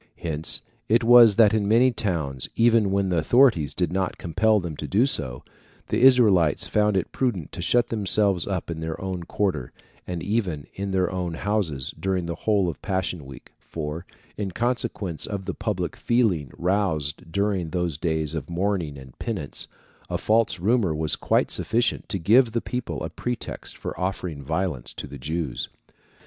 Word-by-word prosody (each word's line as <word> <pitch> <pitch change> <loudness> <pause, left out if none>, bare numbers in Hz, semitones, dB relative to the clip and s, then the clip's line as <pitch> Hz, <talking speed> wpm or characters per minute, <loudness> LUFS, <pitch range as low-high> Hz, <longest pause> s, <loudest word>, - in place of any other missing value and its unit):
Hence 80 -2 -2 0.3
it 115 +2 +4
was 120 -3 +8
that 110 -1 +6
in 105 -2 +1
many 120 +4 +5
towns, 80 - -2
even 115 -3 +4
when 100 0 +1
the 90 -2 +2
authorities 110 - +4
did 90 -1 0
not 95 0 -1
compel 105 +5 +2
them 85 -4 -5
to - - -5
do 110 +6 +3
so, 65 - -2 0.5
the - - +1
Israelites 105 - +5
found 105 -1 +2
it 95 - -2
prudent 110 - -1
to 85 - -6
shut 120 +7 +2
themselves 100 -4 +1
up 95 -4 -3
in 80 - -4
their 80 0 -4
own 95 -2 -4
quarter, 95 -10 -1 0.4
and 90 -2 -4
even 95 -9 -1
in 100 0 -4
their 95 -2 +1
own 90 -2 -3
houses, 85 -9 -1
during 95 -2 -1
the 85 - -3
whole 100 +1 +1
of 80 -3 -5
Passion 90 -6 -2
week; 65 0 -12
for, 80 +2 -6 0.3
in 105 -2 -2
consequence 115 -5 -2
of 100 -2 -4
the - - -3
public 100 -4 -3
feeling 105 - +1
roused 85 -5 -1
during 100 -2 0
those 85 -4 -2
days 80 -2 -1
of 75 -5 -5
mourning 85 -4 -1
and 65 -2 -13
penance, 100 -12 -4 0.4
a - - -1
false 110 -4 +2
rumour 100 -3 +2
was 80 0 0
quite - - +1
sufficient 120 +2 +1
to 95 - -1
give 115 +7 +4
the 115 - +1
people 125 +1 -4
a - - -3
pretext 125 -1 -5
for - - -5
offering 90 -5 -3
violence 80 -2 -3
to - - -6
the 70 -1 -10
Jews. 75 -1 -3
95 Hz, 175 wpm, -25 LUFS, 80-105 Hz, 0.5 s, was